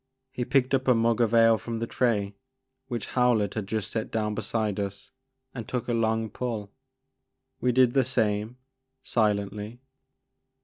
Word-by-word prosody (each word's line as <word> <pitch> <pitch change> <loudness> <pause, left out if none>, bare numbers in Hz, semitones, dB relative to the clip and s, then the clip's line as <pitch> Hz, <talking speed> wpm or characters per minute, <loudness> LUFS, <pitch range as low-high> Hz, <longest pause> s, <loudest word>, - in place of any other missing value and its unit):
He 125 -2 -3
picked 130 0 +2
up 135 0 +1
a 125 - +5
mug 115 0 +2
of 115 -2 +2
ale 115 -1 +5
from 115 -1 -5
the 115 - -2
tray 105 -5 0 0.5
which 120 -3 -4
Howlett 120 -6 +2
had 105 -3 -4
just 110 0 -3
set 110 -1 -3
down 105 -1 -1
beside 105 -1 -2
us 100 -1 -5 0.4
and 115 -4 -7
took 125 -2 -3
a 120 - 0
long 110 -1 +1
pull. 110 -2 -4 0.9
We 125 - +2
did 125 -1 +4
the 135 - +4
same, 110 -2 0 0.5
silently. 105 0 -1
115 Hz, 160 wpm, -27 LUFS, 105-120 Hz, 0.9 s, a